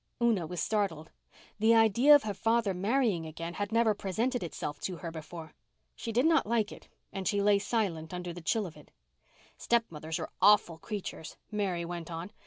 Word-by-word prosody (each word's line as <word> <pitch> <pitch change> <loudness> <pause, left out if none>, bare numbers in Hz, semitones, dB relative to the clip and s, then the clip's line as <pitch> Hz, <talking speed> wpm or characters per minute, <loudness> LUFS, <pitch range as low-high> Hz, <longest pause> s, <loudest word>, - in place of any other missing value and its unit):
Una 225 -8 +2
was 180 +1 -5
startled. 195 -8 -1 0.5
The 225 +2 +5
idea 230 +6 +6
of 290 - +4
her 210 -1 -2
father 225 +1 +1
marrying 200 -3 0
again 165 +2 -6
had 205 +2 -3
never 230 -1 +3
presented 225 +6 -1
itself 150 -3 -5
to 185 - -4
her 165 -1 -6
before. 160 0 -9 0.4
She 230 - -5
did 245 +5 +2
not 320 -8 +3
like 220 -2 +1
it - - -12 0.3
and 190 -1 -3
she 205 - +1
lay 200 0 +4
silent 200 -7 -2
under 180 -1 -5
the 175 - -9
chill 210 +6 0
of 165 - -9
it. - - -16 0.7
"Stepmothers 160 -9 -1
are 160 - -6
awful 195 -6 +5
creatures," 195 -5 -6
Mary 190 -5 -1
went 170 -1 -6
on. 170 +4 -6
200 Hz, 185 wpm, -30 LUFS, 170-225 Hz, 0.7 s, idea